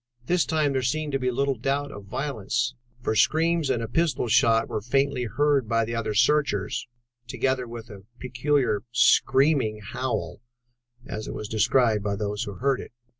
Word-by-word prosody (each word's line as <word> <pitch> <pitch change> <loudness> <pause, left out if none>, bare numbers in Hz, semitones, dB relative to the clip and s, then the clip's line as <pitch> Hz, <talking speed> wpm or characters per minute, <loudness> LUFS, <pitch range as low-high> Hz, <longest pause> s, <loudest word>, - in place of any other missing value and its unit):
This 180 +3 +2
time 155 -3 +1
there 130 - 0
seemed 150 +5 -1
to 135 - 0
be 130 -1 0
little 135 +3 0
doubt 140 +4 -2
of 100 -1 -10
violence, 125 0 -2 0.3
for - - 0
screams 160 +4 +2
and 115 -3 0
a - - -3
pistol 145 -1 0
shot 115 0 +3
were 105 - -3
faintly 135 +2 0
heard 140 +1 +1
by 115 0 +2
other 110 -2 -2
searchers, 120 -5 +1 0.4
together 130 +1 -1
with 115 0 -9
a 100 -2 -12
peculiar 125 -3 0
'screaming 130 -2 +3
howl,' 100 -5 -4 0.6
as 110 0 -6
it - - -5
was 105 - -5
described 110 0 +2
by 100 -1 -1
those 105 0 -3
who 100 - -6
heard 135 +4 0
it. - - -11
125 Hz, 170 wpm, -25 LUFS, 110-140 Hz, 0.6 s, shot